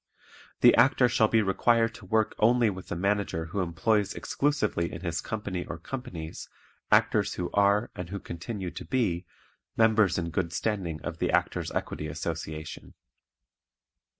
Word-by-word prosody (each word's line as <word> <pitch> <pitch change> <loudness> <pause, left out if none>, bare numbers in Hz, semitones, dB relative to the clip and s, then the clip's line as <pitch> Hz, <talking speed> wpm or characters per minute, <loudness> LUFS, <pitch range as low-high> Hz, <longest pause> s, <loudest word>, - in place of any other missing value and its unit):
The - - +8
Actor 125 -1 +5
shall 115 -2 +3
be 110 0 +3
required 115 +4 +2
to 105 - -12
work 110 +2 +1
only 115 0 +4
with 95 -1 -9
a - - -1
Manager 100 -3 0
who 85 +5 -4
employs 95 +4 +1
exclusively 145 -12 0
in 85 - -7
his 85 -2 -2
company 100 -5 -4
or 85 - -6
companies 90 -11 -7 0.4
actors - - +3
who 90 -1 -3
are, 100 +2 +3
and 90 -1 -6
who 100 +1 -4
continue 90 +2 -6
to - - -7
be, 95 -9 0 0.5
members 110 -5 +4
in 85 -1 -2
good 85 0 -2
standing 85 -6 -2
of - - -5
the - - 0
Actors' - - 0
Equity 75 - -3
Association. 80 0 -6
95 Hz, 150 wpm, -28 LUFS, 85-110 Hz, 0.5 s, The